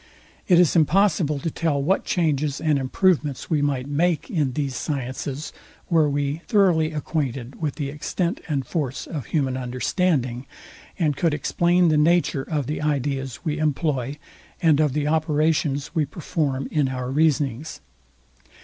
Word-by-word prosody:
It 175 Hz, -3 st, +6 dB
is 180 Hz, -2 st, +4 dB
impossible 165 Hz, -2 st, +3 dB
to 160 Hz, +4 st, -3 dB
tell 160 Hz, -3 st, 0 dB
what 175 Hz, +8 st, +1 dB
changes 150 Hz, -4 st, 0 dB
and 150 Hz, -3 st, +1 dB
improvements 145 Hz, +1 st, 0 dB
we 150 Hz, -2 st, +2 dB
might 140 Hz, -3 st, 0 dB
make 165 Hz, -, 0 dB
in 150 Hz, -, 0 dB
these 140 Hz, -1 st, -2 dB
sciences 135 Hz, 0 st, -4 dB, 0.4 s
were 160 Hz, -3 st, +4 dB
we 145 Hz, +2 st, -1 dB
thoroughly 180 Hz, -8 st, +3 dB
acquainted 135 Hz, -5 st, -3 dB
with 150 Hz, -3 st, -1 dB
the 145 Hz, -3 st, -3 dB
extent 170 Hz, +4 st, -2 dB
and 140 Hz, -5 st, -1 dB
force 135 Hz, -3 st, -3 dB
of 145 Hz, -8 st, -6 dB
human 135 Hz, -5 st, 0 dB
understanding, 130 Hz, 0 st, -1 dB, 0.5 s
and 155 Hz, -5 st, +1 dB
could 165 Hz, 0 st, +1 dB
explain 175 Hz, +3 st, +2 dB
the 155 Hz, -, +3 dB
nature 165 Hz, -2 st, +3 dB
of 145 Hz, 0 st, -2 dB
the 150 Hz, +4 st, -3 dB
ideas 135 Hz, -3 st, -2 dB
we 155 Hz, -1 st, -1 dB
employ, 145 Hz, -3 st, -1 dB, 0.4 s
and 160 Hz, -4 st, +4 dB
of 150 Hz, -4 st, +2 dB
the 150 Hz, 0 st, 0 dB
operations 155 Hz, -2 st, +1 dB
we 155 Hz, -4 st, +1 dB
perform 145 Hz, -4 st, -2 dB
in 150 Hz, -3 st, +2 dB
our 125 Hz, -1 st, -4 dB
reasonings. 145 Hz, -1 st, 0 dB
150 Hz, 150 wpm, -23 LUFS, 135-160 Hz, 0.5 s, It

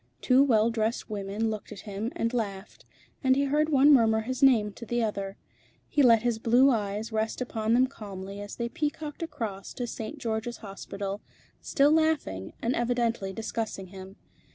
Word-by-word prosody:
Two 255 Hz, -, +4 dB
well 230 Hz, -4 st, +3 dB
dressed 225 Hz, 0 st, -2 dB
women 205 Hz, +2 st, -2 dB
looked 215 Hz, -1 st, -6 dB
at -, -, -8 dB
him 210 Hz, +3 st, -4 dB
and 230 Hz, +1 st, -1 dB
laughed, 200 Hz, -4 st, -4 dB, 0.4 s
and 260 Hz, -1 st, +4 dB
he 280 Hz, -, +2 dB
heard 300 Hz, +3 st, +1 dB
one 285 Hz, 0 st, +6 dB
murmur 220 Hz, -4 st, +4 dB
his 255 Hz, +3 st, -4 dB
name 225 Hz, -7 st, +5 dB
to 235 Hz, -, -11 dB
the 240 Hz, 0 st, -1 dB
other. 200 Hz, -2 st, -3 dB, 0.5 s
He 295 Hz, -, +2 dB
let 230 Hz, -4 st, +6 dB
his 235 Hz, -2 st, 0 dB
blue 245 Hz, +5 st, +5 dB
eyes 210 Hz, 0 st, -2 dB
rest 220 Hz, 0 st, -1 dB
upon 225 Hz, -2 st, 0 dB
them 255 Hz, +1 st, +5 dB
calmly 200 Hz, -5 st, -8 dB
as 205 Hz, -, -7 dB
they 235 Hz, -, -2 dB
peacocked 300 Hz, +3 st, -4 dB
across 225 Hz, -12 st, -5 dB
to 245 Hz, -, -3 dB
St. 230 Hz, +5 st, -6 dB
George's 230 Hz, -2 st, -3 dB
Hospital, 200 Hz, -1 st, -6 dB, 0.4 s
still 285 Hz, +1 st, +3 dB
laughing, 315 Hz, -, +1 dB
and 235 Hz, +2 st, +1 dB
evidently 235 Hz, -4 st, 0 dB
discussing 215 Hz, -2 st, -4 dB
him. 190 Hz, 0 st, -10 dB
225 Hz, 175 wpm, -28 LUFS, 205-255 Hz, 0.5 s, one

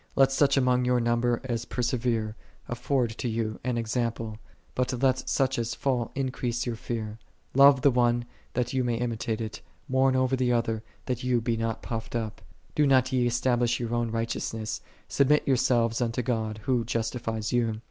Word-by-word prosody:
Let 135 Hz, 0 st, +5 dB
such 140 Hz, 0 st, +3 dB
among 125 Hz, -1 st, +3 dB
your 125 Hz, 0 st, +2 dB
number 120 Hz, 0 st, +1 dB
as 120 Hz, -2 st, -2 dB
persevere 120 Hz, -3 st, -1 dB, 0.3 s
afford 120 Hz, -1 st, 0 dB
to 125 Hz, -, -1 dB
you 110 Hz, -1 st, -2 dB
an 125 Hz, -1 st, -1 dB
example: 115 Hz, -1 st, -2 dB, 0.3 s
but 125 Hz, -1 st, -1 dB
let 130 Hz, 0 st, +1 dB
such 135 Hz, -2 st, +1 dB
as 115 Hz, 0 st, -2 dB
fall 125 Hz, -4 st, 0 dB
increase 125 Hz, -2 st, -2 dB
your 120 Hz, -2 st, -2 dB
fear. 110 Hz, -1 st, -5 dB, 0.3 s
Love 140 Hz, -1 st, +7 dB
the 140 Hz, -, +6 dB
one 120 Hz, -1 st, +2 dB, 0.3 s
that 125 Hz, 0 st, -1 dB
ye 130 Hz, -, +2 dB
may 120 Hz, -2 st, 0 dB
imitate 115 Hz, -1 st, -2 dB
it; 110 Hz, -1 st, -5 dB, 0.3 s
mourn 130 Hz, 0 st, +3 dB
over 130 Hz, 0 st, +2 dB
the 125 Hz, -1 st, +1 dB
other, 115 Hz, -2 st, 0 dB, 0.2 s
that 125 Hz, -2 st, -2 dB
ye 125 Hz, -1 st, +2 dB
be 115 Hz, 0 st, 0 dB
not 115 Hz, 0 st, -2 dB
puffed 115 Hz, 0 st, -5 dB
up. 110 Hz, -3 st, -3 dB, 0.3 s
Do 150 Hz, -1 st, +3 dB
not 130 Hz, -1 st, +4 dB
ye 125 Hz, -1 st, +3 dB
establish 120 Hz, 0 st, +1 dB
your 120 Hz, -1 st, -3 dB
own 120 Hz, -1 st, 0 dB
righteousness; 115 Hz, -1 st, -3 dB, 0.3 s
submit 145 Hz, +2 st, +3 dB
yourselves 120 Hz, -3 st, +2 dB
unto 120 Hz, +1 st, 0 dB
God 110 Hz, -3 st, -2 dB
Who 125 Hz, -1 st, +1 dB
justifies 115 Hz, -1 st, -2 dB
you. 115 Hz, -3 st, +1 dB
120 Hz, 175 wpm, -27 LUFS, 115-130 Hz, 0.3 s, Love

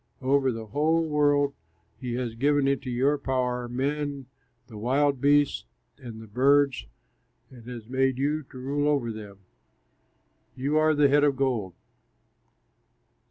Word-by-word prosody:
Over 135 Hz, 0 st, +2 dB
the 115 Hz, -1 st, -6 dB
whole 160 Hz, +8 st, +1 dB
world 145 Hz, -2 st, +2 dB, 0.5 s
he 125 Hz, -2 st, -4 dB
has 120 Hz, -2 st, -3 dB
given 140 Hz, +3 st, +1 dB
into 140 Hz, -1 st, -1 dB
your 135 Hz, +4 st, +1 dB
power, 125 Hz, -2 st, -2 dB
men, 140 Hz, +2 st, -3 dB, 0.4 s
the 110 Hz, -3 st, -11 dB
wild 135 Hz, +3 st, +1 dB
beasts 145 Hz, 0 st, +2 dB, 0.3 s
and 120 Hz, -5 st, -9 dB
the 110 Hz, -, -10 dB
birds, 135 Hz, -, +2 dB, 0.6 s
and 120 Hz, -3 st, -14 dB
has 120 Hz, -3 st, -8 dB
made 130 Hz, 0 st, 0 dB
you 150 Hz, +3 st, -1 dB
rule 140 Hz, +3 st, -2 dB
over 140 Hz, -6 st, 0 dB
them 105 Hz, -2 st, -10 dB
all. -, -, -44 dB
You 140 Hz, +4 st, -1 dB
are 155 Hz, 0 st, +3 dB
the 145 Hz, -1 st, +5 dB
head 145 Hz, +1 st, +3 dB
of 145 Hz, -2 st, +3 dB
gold. 120 Hz, -10 st, -1 dB
135 Hz, 140 wpm, -26 LUFS, 120-145 Hz, 0.6 s, the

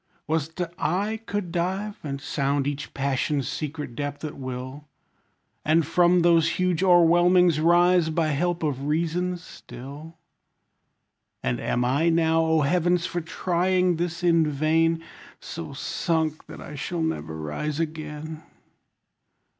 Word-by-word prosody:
Was't 160 Hz, +2 st, -2 dB, 0.2 s
I 195 Hz, +8 st, 0 dB
could 200 Hz, -4 st, -3 dB
dive, 190 Hz, +4 st, -2 dB
and 140 Hz, -2 st, -4 dB
sound 140 Hz, -1 st, -1 dB
each 145 Hz, 0 st, -4 dB
passion's 140 Hz, 0 st, 0 dB
secret 150 Hz, -4 st, -4 dB
depth 145 Hz, +2 st, -4 dB
at 150 Hz, -, -6 dB
will? 130 Hz, +2 st, -7 dB, 0.8 s
And 160 Hz, +1 st, +3 dB
from 175 Hz, +2 st, +4 dB
those 170 Hz, -2 st, +4 dB
huge 180 Hz, -2 st, +1 dB
o'erwhelmings 175 Hz, -1 st, +5 dB
rise, 175 Hz, +1 st, +4 dB
by 160 Hz, 0 st, +1 dB
help 175 Hz, +4 st, 0 dB
of 140 Hz, -3 st, -2 dB
reason 170 Hz, +3 st, 0 dB
still? 155 Hz, -1 st, -11 dB, 1.3 s
And 60 Hz, -1 st, -1 dB
am 125 Hz, 0 st, 0 dB
I 145 Hz, +7 st, +2 dB
now, 165 Hz, 0 st, +3 dB
O 160 Hz, -1 st, +2 dB
heavens! 175 Hz, +3 st, +2 dB
for 175 Hz, -1 st, -2 dB
trying 180 Hz, +1 st, +1 dB
this 170 Hz, +1 st, -3 dB
in 165 Hz, -2 st, +4 dB
vain, 160 Hz, +3 st, +1 dB, 0.4 s
So -, -, -7 dB
sunk 160 Hz, -2 st, -2 dB
that -, -, -10 dB
I -, -, -9 dB
shall 165 Hz, +4 st, -3 dB
never 160 Hz, -, -3 dB
rise 80 Hz, -, -3 dB
again? 155 Hz, -1 st, -5 dB
160 Hz, 130 wpm, -25 LUFS, 145-175 Hz, 1.3 s, o'erwhelmings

